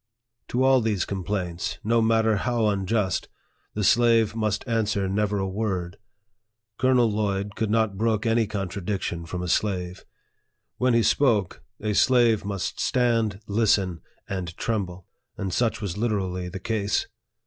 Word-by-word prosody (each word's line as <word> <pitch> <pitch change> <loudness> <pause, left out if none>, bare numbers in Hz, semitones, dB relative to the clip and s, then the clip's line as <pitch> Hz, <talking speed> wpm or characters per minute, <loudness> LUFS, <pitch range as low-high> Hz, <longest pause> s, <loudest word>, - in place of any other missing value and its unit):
To 125 +2 0
all 130 -1 +5
these 110 -4 0
complaints, 90 -3 -3
no 115 +2 +2
matter 110 -1 +3
how 115 +4 0
unjust, 100 -1 -1 0.5
the 105 - -1
slave 115 -1 +4
must 110 +1 -1
answer 110 -4 0
never 105 +1 0
a 95 -1 -1
word. 95 -3 -3 0.8
Colonel 130 -2 +4
Lloyd 100 -1 -1
could 110 -1 -1
not 110 -3 +1
brook 110 -1 +1
any 115 -1 +2
contradiction 95 -4 -3
from 90 +2 -4
a - - -3
slave. 90 -1 -1 0.7
When 125 -1 +2
he 115 - +4
spoke, 110 -11 +2 0.2
a 105 0 -1
slave 120 -1 +4
must 100 -2 -3
stand, 115 -5 +1
listen, 100 -5 +1 0.3
and 90 -3 -5
tremble; 95 -5 -3 0.3
and 95 -2 -3
such 115 0 0
was 100 -1 -4
literally 95 -5 -1
the 95 - -6
case. 105 0 -1
105 Hz, 140 wpm, -25 LUFS, 95-115 Hz, 0.8 s, all